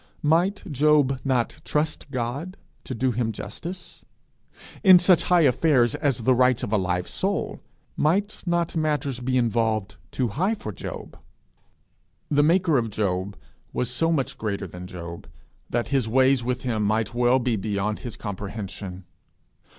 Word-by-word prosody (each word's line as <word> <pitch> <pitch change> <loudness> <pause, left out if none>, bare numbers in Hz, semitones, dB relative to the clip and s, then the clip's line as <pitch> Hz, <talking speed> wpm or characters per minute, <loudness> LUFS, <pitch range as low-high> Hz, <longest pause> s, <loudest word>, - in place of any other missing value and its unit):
Might 175 +7 +2
he 150 0 +4 0.2
not 125 -3 0
trust 150 0 -1
him 135 +8 -3 0.3
to 130 - -5
do 130 +2 +1
him 115 -1 -1
justice? 175 - -8 0.8
In 190 -3 +9
such 180 -1 +4
high 180 -1 +4
affairs 130 -4 +3
as 140 -5 0
the 130 - +4
rights 125 -1 +3
of 105 - -3
a - - +4
live 90 -2 -1
soul, - - -2 0.4
might 200 +7 0
not 170 -1 0
matters 150 -5 -1
be 130 +1 0
involved 115 -3 0
too 125 -3 -1
high 185 - 0
for 110 - -6
Job? 90 - -8 1.1
The 145 0 +4
maker 165 -2 +3
of 115 -1 -2
Job 100 -2 -2 0.4
was 125 0 -1
so 165 +6 +1
much 140 -5 -1
greater 100 -2 -2
than 90 +1 -9
Job, 85 -2 -8 0.4
that 120 0 -1
his 135 -5 +1
ways 130 +1 +3
with 125 +1 -2
him 115 -4 -1
might 110 +2 0
well 120 +1 +3
be 125 -2 0
beyond 105 +1 -2
his 120 -3 -7
comprehension! 100 -2 -6
125 Hz, 150 wpm, -25 LUFS, 110-150 Hz, 1.1 s, In